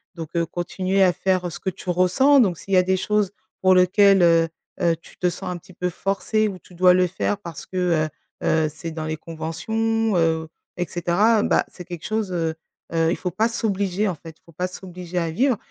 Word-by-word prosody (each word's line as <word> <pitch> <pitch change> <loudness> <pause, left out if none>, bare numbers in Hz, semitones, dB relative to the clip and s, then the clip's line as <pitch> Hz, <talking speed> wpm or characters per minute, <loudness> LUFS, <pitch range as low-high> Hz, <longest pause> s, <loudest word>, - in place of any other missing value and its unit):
Donc, 165 -3 -6
heu, 170 -1 +1
continuer 185 +3 0
à 180 -1 +4
faire 185 -2 0
ce - - -8
que 190 - -2
tu 185 -1 -4
ressens 185 +11 +4
donc 190 -9 +3
s'il 195 - -6
y - - +6
a 185 - +7
des 190 +1 +1
choses 210 +1 +1 0.3
pour 185 0 +5
lequel, 195 +1 +5
heu 165 -1 +5 0.3
heu, 170 -1 +3
tu 165 - -18
te 180 - +1
sens 185 +2 -7
un 180 - -4
petit 175 +2 -16
peu 180 +1 -2
forcée 200 +4 0
ou 195 - -5
tu 180 - -19
dois 180 +1 +5
le 185 0 +4
faire 190 +3 -1
parce 170 -6 -9
que 185 - -6
heu 170 -4 +1 0.3
heu, 160 -1 +2
c'est 165 +1 -6
dans 160 -1 -5
les 155 0 -3
conventions, 220 +8 -1
heu 160 -1 +1 0.3
et 180 -1 -2
cetera, 200 +6 +2
bah, - - +2
c'est 180 - -10
quelque 175 -3 -8
chose, 215 -3 -1
heu 165 -2 -1 0.4
heu 165 0 +2
il - - +1
faut 180 - -3
pas 220 +6 +1
s'obliger 205 -3 -1
en 190 - 0
fait. 160 0 -12
Il - - -47
faut 170 - -17
pas 180 +3 -2
s'obliger 180 -1 -8
à 165 -2 0
vivre 250 - +2
180 Hz, 230 wpm, -23 LUFS, 170-195 Hz, 0.4 s, a